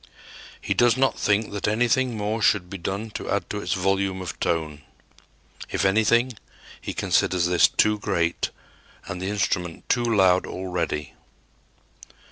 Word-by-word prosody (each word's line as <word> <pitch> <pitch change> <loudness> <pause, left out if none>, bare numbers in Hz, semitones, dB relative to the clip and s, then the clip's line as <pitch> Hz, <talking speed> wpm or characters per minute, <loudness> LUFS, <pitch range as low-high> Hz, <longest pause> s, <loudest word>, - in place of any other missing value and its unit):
He - - -1
does 120 0 +3
not 135 0 +1
think 105 +1 +1
that 100 0 -3
anything 120 +2 +1
more 105 +2 -2
should 95 -4 +2
be 95 - -6
done 100 +5 -4
to - - -6
add 100 -4 -1
to 105 - -3
its - - -1
volume 95 0 0
of 90 -2 -6
tone. 80 -3 -2 0.9
If - - -1
anything, 115 +5 +3 0.5
he - - -5
considers 90 -1 +1
this 90 0 +5
too 105 0 +2
great 85 -4 -1 0.6
and 90 - -6
the 95 - -2
instrument 90 -4 -2
too 120 - +2
loud 95 -5 +3
already. 90 -5 -3
100 Hz, 145 wpm, -24 LUFS, 90-110 Hz, 0.9 s, this